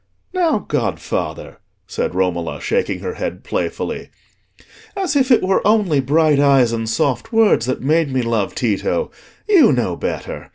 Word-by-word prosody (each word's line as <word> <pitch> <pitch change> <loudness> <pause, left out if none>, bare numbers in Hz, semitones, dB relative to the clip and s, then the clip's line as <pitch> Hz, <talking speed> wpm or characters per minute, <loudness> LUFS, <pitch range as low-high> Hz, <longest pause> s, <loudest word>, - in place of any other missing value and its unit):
"Now, 350 -4 +2
godfather," - - -3 0.3
said 485 +1 -3
Romola, - - -1
shaking 475 +1 -1
her 455 - -4
head - - -5
playfully, - - -4 0.9
"as 380 -6 -1
if 265 -2 +2
it 245 - +4
were 190 +1 +2
only 205 -8 +2
bright 150 +2 +2
eyes 135 -4 +4
and 115 -1 -3
soft 125 +1 -1
words 225 - +3
that 130 - -2
made 155 +2 +2
me 130 -1 0
love 115 -4 -1
Tito! 120 - -1 0.4
You 360 - +6
know 120 -9 0
better. - - -5
155 Hz, 150 wpm, -19 LUFS, -, 0.9 s, You